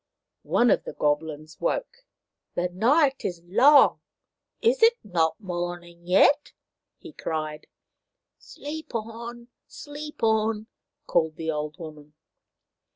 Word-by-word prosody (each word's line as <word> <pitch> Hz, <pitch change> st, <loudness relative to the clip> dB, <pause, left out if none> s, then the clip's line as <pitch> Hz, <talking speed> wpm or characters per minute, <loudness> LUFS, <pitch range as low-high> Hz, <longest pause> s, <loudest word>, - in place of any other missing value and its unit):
One 240 Hz, 0 st, +4 dB
of -, -, +2 dB
the -, -, -7 dB
Goblins 155 Hz, +1 st, -2 dB
woke. -, -, -3 dB, 0.2 s
" -, -, -58 dB
The 175 Hz, +1 st, 0 dB
night 270 Hz, -, +2 dB
is 175 Hz, -2 st, -4 dB
long. 275 Hz, +11 st, +6 dB, 0.6 s
Is 485 Hz, +2 st, +2 dB
it 460 Hz, +1 st, +6 dB
not 165 Hz, -5 st, 0 dB
morning 175 Hz, -2 st, -6 dB
yet 280 Hz, -, +4 dB, 0.2 s
?" -, -, -61 dB
he 340 Hz, -, -10 dB
cried. 155 Hz, -, -4 dB, 0.4 s
" -, -, -60 dB, 0.2 s
Sleep 305 Hz, -2 st, -8 dB
on! 235 Hz, +2 st, -6 dB, 0.2 s
Sleep 300 Hz, -, -9 dB
on! 220 Hz, -1 st, +1 dB, 0.2 s
" -, -, -58 dB
called 160 Hz, -2 st, +1 dB
the 160 Hz, 0 st, -3 dB
old 150 Hz, 0 st, -4 dB
woman. 150 Hz, -2 st, -11 dB
205 Hz, 130 wpm, -26 LUFS, -, 0.6 s, long